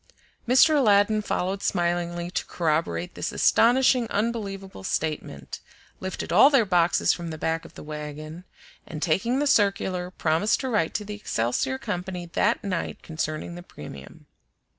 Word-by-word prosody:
Mr. 285 +6 +6
Aladdin 215 -4 +4
followed 190 -1 -2
smilingly 175 -1 -1
to - - -1
corroborate 155 - -1
this - - -3
astonishing, 245 0 +4
unbelievable 200 - -3
statement; 145 - -3 0.4
lifted 185 -2 -4
all 215 +10 +8
their 270 -6 +4
boxes 175 -3 +3
from 170 -1 -6
the 160 - -6
back 165 +1 -2
of - - -14
the - - -9
wagon, 150 +2 -7 0.4
and 155 -1 -5
taking 230 +10 +1
the 290 - +1
circular, 195 -7 +1
promised 170 +3 +1
to 265 - -2
write 210 -9 0
to 210 - -2
the 210 - -6
Excelsior 130 - -1
Company 180 +3 -4
that 205 +6 0
night 185 -4 -3
concerning 155 +1 -4
the 175 - -8
premium. 70 - -11
180 Hz, 145 wpm, -25 LUFS, 160-210 Hz, 0.4 s, all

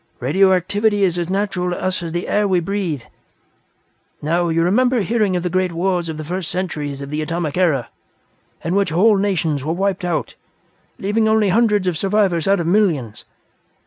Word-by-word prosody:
Radioactivity 195 - +2
is 180 -2 +1
as 175 0 -3
natural 190 -2 -1
to 175 - -3
us 185 -1 -2
as 165 -1 -5
the 175 +1 -3
air 210 0 +1
we 185 -2 +2
breathe. 175 - -3 1.2
Now, 170 +3 0
you 165 0 +1
remember 245 +6 +2
hearing 205 -1 +1
of 175 - -1
the 180 - -1
great 185 0 +1
wars 175 0 -1
of 160 - -5
the 155 - -5
first 180 +2 -4
centuries 150 -6 -4
of 140 - -8
the 150 +1 -2
Atomic 160 -1 -3
Era, 165 -9 +1 0.7
in 165 - -1
which 200 -2 +2
whole 200 +7 +4
nations 165 -8 0
were 155 +3 -1
wiped 195 +1 -1
out, 175 -3 -2 0.6
leaving 220 +3 0
only 220 -2 +3
hundreds 210 -1 +2
of 175 -4 -1
survivors 195 -4 +1
out 195 0 +3
of 170 - -2
millions. 165 - 0
180 Hz, 180 wpm, -19 LUFS, 165-200 Hz, 1.2 s, whole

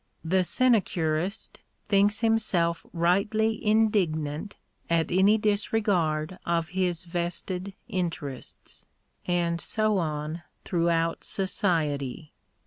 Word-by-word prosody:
The 185 +3 +3
sine 235 +5 +4
curist 170 +4 -2 0.3
thinks 205 +1 +3
himself 200 -7 +1
rightly 205 +6 +1
indignant 200 -6 +1 0.3
at 165 0 +1
any 195 +4 +5
disregard 200 -6 0
of 170 -1 0
his 180 -2 -1
vested 180 +2 -3
interests. 170 - -5 0.4
And 170 -1 0
so 215 -2 +1
on 155 0 -3 0.2
throughout 165 -1 +1
society. 155 - -1
180 Hz, 90 wpm, -27 LUFS, 165-205 Hz, 0.4 s, any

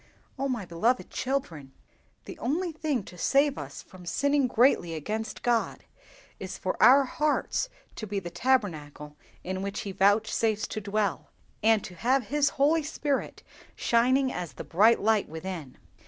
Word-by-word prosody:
Oh, 275 - 0
my 235 -6 -2
beloved 220 +9 0
children, 165 - -3 0.5
the 330 - -9
only 330 +8 -1
thing 305 -7 -2
to 180 -2 -13
save 280 - +3
us - - -8
from 180 -2 -14
sinning 285 +6 +2
greatly 235 -9 +3
against 215 +8 -4
God 235 -2 0 0.6
is - - -6
for - - -2
our 275 +3 +8
hearts 300 - -1 0.3
to 220 - -5
be 200 0 -2
the 175 -2 -8
tabernacle 170 - -1 0.3
in 185 +1 -4
which 200 0 -3
He 200 - -5
vouchsafes 210 +2 +2
to 215 - -4
dwell, 205 -1 -2 0.3
and 220 -1 +4
to 180 - -8
have 245 +6 0
his 290 0 +2
Holy 300 +4 +3
Spirit 295 -2 -3 0.3
shining 255 +3 +2
as 175 -3 -5
the - - -7
bright 215 +7 +4
light 215 -1 +2
within! 160 -3 -7
220 Hz, 155 wpm, -28 LUFS, 185-270 Hz, 0.6 s, our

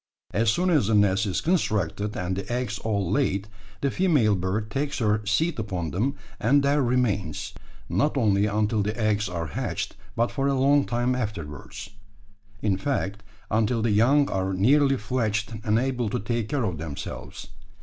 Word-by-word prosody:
As 115 +2 +2
soon 180 +10 +2
as 145 - +3
the 110 - +2
nest 105 0 +3
is 95 - -1
constructed 105 - 0
and 90 +1 -2
the 100 +3 -5
eggs 120 -4 -2
all 100 -5 -1
laid, 100 -6 +1 0.3
the 140 - +1
female 145 - +3
bird 100 +4 -2
takes 145 +1 -2
her 105 -2 +1
seat 155 +8 +1
upon 90 -7 -3
them, 125 +10 0 0.2
and 140 +6 +3
there 140 +1 +3
remains; 110 - 0 0.3
not 150 0 +1
only 105 -4 +3
until 105 +1 +1
the 105 +3 -2
eggs 105 -2 +1
are 85 -2 -3
hatched, - - -3 0.2
but 115 +1 +1
for 135 -1 0
a 140 - +2
long 140 +1 +4
time 120 +1 0
afterwards 100 - -5 0.7
in 100 -3 +2
fact, 100 -4 -2 0.3
until 110 +1 +1
the 115 - +2
young 135 +7 +4
are 95 0 -1
nearly 135 +7 +4
fledged 110 -1 -1
and 105 +1 +2
able 125 -2 0
to - - -1
take 115 +1 -2
care 140 -4 0
of 90 -8 -2
themselves. 80 +4 -7
110 Hz, 170 wpm, -25 LUFS, 100-130 Hz, 0.7 s, long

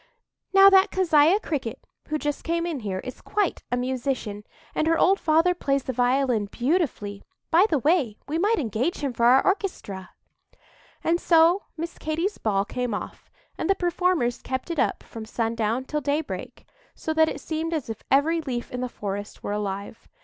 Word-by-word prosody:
"Now 390 0 +8
that 385 +1 +6
Keziah 340 0 +4
Cricket, 270 - -4 0.2
who 305 - -1
just 295 -1 -3
came 335 0 -1
in 330 -5 -3
here, 200 -5 -3
is 255 - -8
quite 410 -3 -1
a 245 - +1
musician, 250 -4 -2 0.3
and 310 - 0
her 330 0 +3
old 390 +4 +4
father 325 +3 +3
plays 275 -6 0
the 260 - -3
violin 245 -3 +1
beautifully;—by 260 - 0
the 305 - +2
way, 280 - +1
we 310 +3 -1
might 425 +5 +2
engage 245 - -1
him 275 -3 -1
for 235 0 +1
our 260 +2 +5
orchestra." 280 - -2 0.9
And 340 +1 +1
so 335 +3 +4
Miss 335 +2 -5
Katy's 330 +6 -2
ball 200 -2 +1
came 245 -2 -2
off, - - -8 0.3
and - - -2
the 390 - +4
performers 350 -9 0
kept 260 +6 -4
it 330 - -2
up - - 0
from 225 - -9
sundown 230 +2 -1
till 300 +2 -2
daybreak, 290 +2 -3 0.3
so 315 - -3
that 315 0 +4
it - - -5
seemed 320 +1 -3
as 315 -5 -2
if 225 -1 -6
every 320 +5 +3
leaf 250 -5 -4
in 250 - -4
the 250 - -2
forest 205 -2 -6
were - - -3
alive. 200 +1 -5
285 Hz, 180 wpm, -25 LUFS, 235-335 Hz, 0.9 s, Now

